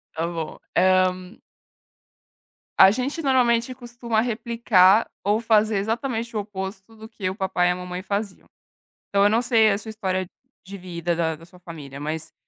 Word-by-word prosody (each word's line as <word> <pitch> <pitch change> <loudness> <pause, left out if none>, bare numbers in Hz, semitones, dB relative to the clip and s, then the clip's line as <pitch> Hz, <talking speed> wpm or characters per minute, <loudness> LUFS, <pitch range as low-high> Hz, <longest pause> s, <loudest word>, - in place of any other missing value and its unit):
Tá 165 +1 -1
bom. 165 -2 -6 0.2
Ah 185 +1 +4 1.7
a 190 - +9
gente 260 - -2
normalmente 250 -3 +2
costuma 240 -2 -3
replicar 225 -3 +3 0.2
ou 205 +2 +2
fazer 220 -2 +2
exatamente 230 +3 -3
o - - 0
oposto 195 +1 -7
do 220 0 -11
que 210 -4 -4
o 190 - -5
papai 190 -3 0
e - - +3
a - - -1
mamãe 180 0 -6
faziam. 200 0 -4 0.6
Então 200 0 +2
eu 205 - +5
não 225 +3 +2
sei 225 -3 +4
a 200 - +1
sua 215 +2 -8
história 185 -4 -2 0.4
de 200 +1 -8
vida, 175 -2 -3
da 165 -1 -1
da 165 - -15
sua 180 +1 -19
família, 150 -6 -10
mas, 155 +2 -5
200 Hz, 170 wpm, -23 LUFS, 180-230 Hz, 1.7 s, a